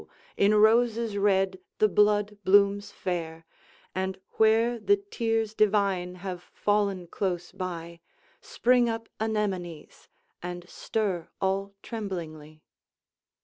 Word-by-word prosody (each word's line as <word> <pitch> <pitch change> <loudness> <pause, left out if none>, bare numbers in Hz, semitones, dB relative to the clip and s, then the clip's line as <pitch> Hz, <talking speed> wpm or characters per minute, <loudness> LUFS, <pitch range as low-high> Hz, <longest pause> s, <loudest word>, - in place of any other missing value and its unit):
in 205 +2 +4
roses 225 0 +3
red 195 -2 +2 0.2
the 215 - +4
blood 210 0 +2
blooms 200 +1 +4
fair, 165 -4 -4 0.5
And 190 0 -2 0.2
where 225 +2 +3
the 405 - +3
tears 225 - -2
divine 200 -4 +1
have 180 -2 -4
fallen 200 -3 +1
close 175 0 -3
by, 170 -3 -6 0.4
Spring 245 -1 +2
up 225 0 -4
anemones, 195 -7 -3 0.3
and 175 0 -6
stir 195 -4 -2
all 195 +1 -1
tremblingly. 160 -8 -6
200 Hz, 105 wpm, -27 LUFS, 180-220 Hz, 0.5 s, in